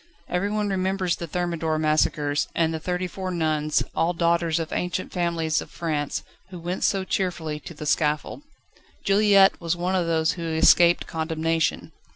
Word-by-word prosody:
Everyone 205 +3 -1
remembers 190 -2 0
the 170 - -6
Thermidor 165 -2 -1
massacres, 155 -1 +1
and 165 -1 +1
the 160 - -3
thirty 180 +2 -2
four 185 +1 -5
nuns, 155 -3 0
all 170 +2 +1
daughters 170 -1 +1
of 165 -1 -4
ancient 180 +1 -2
families 170 -3 0
of - - -10
France, 150 -4 -3 0.3
who 185 - -8
went 175 +2 -4
so 195 -1 +2
cheerfully 170 -5 -2
to 170 - -10
the 150 - -7
scaffold. 150 - 0 0.6
Juliette 200 -1 +4
was 170 0 0
one 180 +2 -2
of 180 -3 +1
those 160 -1 +2
who 170 - -6
escaped 170 +2 +5
condemnation. 160 0 -1
170 Hz, 160 wpm, -24 LUFS, 160-180 Hz, 0.6 s, escaped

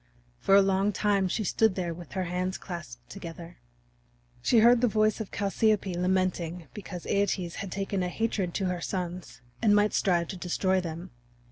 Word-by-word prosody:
For 195 - +4
a 200 - +7
long 195 +1 +2
time 200 -1 +1
she 215 +4 -1
stood 220 0 +2
there 175 -3 -2
with 170 -1 -11
her 190 -1 -1
hands 180 +1 -2
clasped 135 -10 -8
together. 170 -2 -9 0.8
She 235 - +3
heard 235 +2 +6
the 250 - +4
voice 215 0 +2
of 215 - -6
Chalciope 205 -1 +1
lamenting 180 -2 0
because 185 -4 -8
Æetes 190 -3 0
had 195 -2 -6
taken 195 0 -2
a 180 - -1
hatred 195 -4 -2
to 195 - 0
her 180 -1 -2
sons 180 -8 -5 0.2
and 210 -2 +5
might 210 0 +3
strive 175 -4 +2
to 190 - -5
destroy 185 +1 0
them. 170 +1 -6
185 Hz, 175 wpm, -28 LUFS, 175-200 Hz, 0.8 s, a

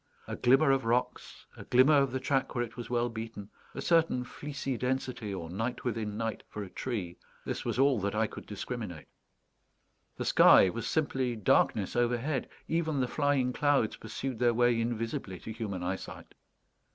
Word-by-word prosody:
A - - -4
glimmer 135 +4 +4
of 135 -1 +2
rocks, 120 +2 -2
a - - -9
glimmer 130 +4 +5
of 135 -2 +2
the 130 - -2
track 135 0 0
where 120 - +1
it 120 - -8
was 120 - -7
well 120 0 +1
beaten, 110 -3 -7 0.2
a - - -4
certain 165 -7 +3
fleecy 135 +1 -5
density, 125 -3 -2
or 90 -4 -5
night 115 +8 -3
within 110 -3 -2
night, 115 -1 -3
for 105 - -5
a 95 - -10
tree 100 -9 -4 0.3
this - - -3
was - - -2
all 135 -2 +4
that 100 +1 -2
I 110 +1 +2
could - - -9
discriminate. 105 -5 -6 1.1
The - - -3
sky 95 - +7
was 115 +3 -4
simply 130 -4 0
darkness 110 -4 +2
overhead; 120 +4 0 0.2
even 160 -3 0
the 125 - +1
flying 140 -2 +1
clouds 145 -6 +2
pursued 115 +2 -5
their 120 -1 +3
way 120 -1 +3
invisibly 115 -5 -3
to 110 - -7
human 105 -5 -4
eyesight. 95 +2 -5
120 Hz, 175 wpm, -30 LUFS, 110-130 Hz, 1.1 s, sky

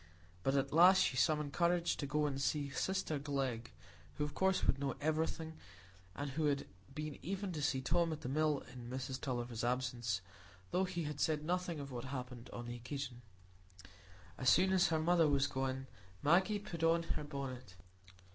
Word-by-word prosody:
But 135 +9 +1
at 140 0 +1
last 180 +4 +8
she - - 0
summoned 150 +1 +2
courage 170 0 +2
to 140 - -3
go 150 +1 +1
and 140 -2 -1
see 140 0 0
sister 185 -2 -1
Glegg, 135 -5 -2 0.4
who 150 - -1
of 150 - -3
course 190 0 +2
would 135 - +2
know 140 -2 -1
everything, 160 +1 -1 0.6
and 145 +5 -3
had 145 -1 +1 0.3
been 150 -1 -4
even 195 +2 -3
to 155 -3 -3
see 140 -2 +1
Tom 170 +5 +2
at 155 - -4
the - - -5
Mill 150 +1 +1
in 120 -2 -8
Mrs 130 0 -4
Tulliver's 120 -3 -3
absence, 120 -4 0 0.5
though 190 - +2
he 180 -2 -3
had 150 -1 -4
said 150 0 +1
nothing 175 -1 -1
of 140 -1 -6
what 120 0 -5
had 130 -2 -3
passed 125 0 -10
on 120 - -6
the 120 0 -5
occasion. 125 0 -5 1.2
As 130 - +4
soon 190 +2 +5
as 185 -2 +5
her 160 - +1
mother 165 0 +4
was 140 -1 +3
gone, 135 -1 -2 0.4
Maggie 185 +7 +4
put 200 -5 -6
on 165 +1 +4
her 165 - -3
bonnet. 130 -8 -6
145 Hz, 185 wpm, -36 LUFS, 130-165 Hz, 1.2 s, last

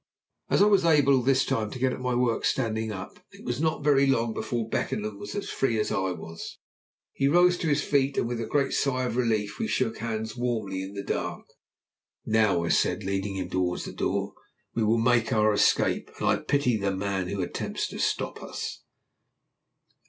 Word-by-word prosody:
As - - +4
I - - +6
was 200 -3 +4
able 145 -5 +4
this 130 +1 +3
time 110 -2 -1
to - - -7
get 130 0 +1
at - - -6
my 125 -1 -1
work 120 -2 +1
standing 110 -3 0
up, 95 -3 -8
it - - -14
was 120 +3 -2
not 160 -2 0
very 140 -2 +4
long 115 -4 +1
before 115 -1 -3
Beckenham 105 -2 -2
was 100 0 -7
as 205 - -3
free 120 -5 0
as 105 - -1
I 95 0 0
was. 80 -1 -8 0.6
He 135 - +1
rose 175 +4 +5
to 165 - -1
his 145 -1 +2
feet 140 -1 +1
with 120 0 -3
a 115 - -4
great 140 -2 +1
sigh 130 -2 +1
of 125 - -2
relief, 110 -4 0
and 225 - 0
we - - -3
shook 120 - -1
hands 110 -1 -3
warmly 110 -6 -2
in 95 +1 -7
the 100 - -4
dark. - - -3 0.8
"Now," 110 -6 +2
I 85 - -2
said, 105 - +2
leading 95 +1 -2
him 90 -2 -4
towards 90 -1 -1
the - - -7
door, - - -1 0.4
"we 115 - 0
will 110 +2 +3
make 115 -1 +2
our 110 -1 +3
escape, 105 - +2
and - - -1
I - - +4
pity 135 -5 +1
the 100 -1 -1
man 95 -1 -2
who 100 0 -2
attempts 85 - -3
to - - -7
stop - - -1
us." - - -6
115 Hz, 205 wpm, -27 LUFS, 100-135 Hz, 0.8 s, I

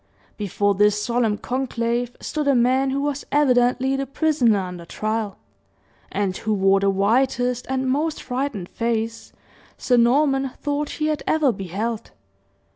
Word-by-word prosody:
Before 205 0 0
this 210 +1 +3
solemn 230 -1 0
conclave 245 -1 -2
stood 300 -2 -3
a 280 - +4
man 255 +3 +3
who 275 +1 -1
was 290 0 -2
evidently 260 -2 +3
the 270 0 -2
prisoner 275 -6 +2
under 180 -2 -5
trial, 215 +3 -3 0.7
and 195 -2 -1
who 215 -1 -1
wore 195 0 +3
the 200 0 +2
whitest 245 +5 +1
and 265 0 -1
most 300 +4 0
frightened 250 -8 -3
face 230 -1 -2 0.5
Sir 245 - +2
Norman 270 +2 +3
thought 290 0 -2
he 305 - -1
had 305 -1 0
ever 310 -4 +3
beheld. 205 +3 -4
245 Hz, 140 wpm, -22 LUFS, 210-270 Hz, 0.7 s, a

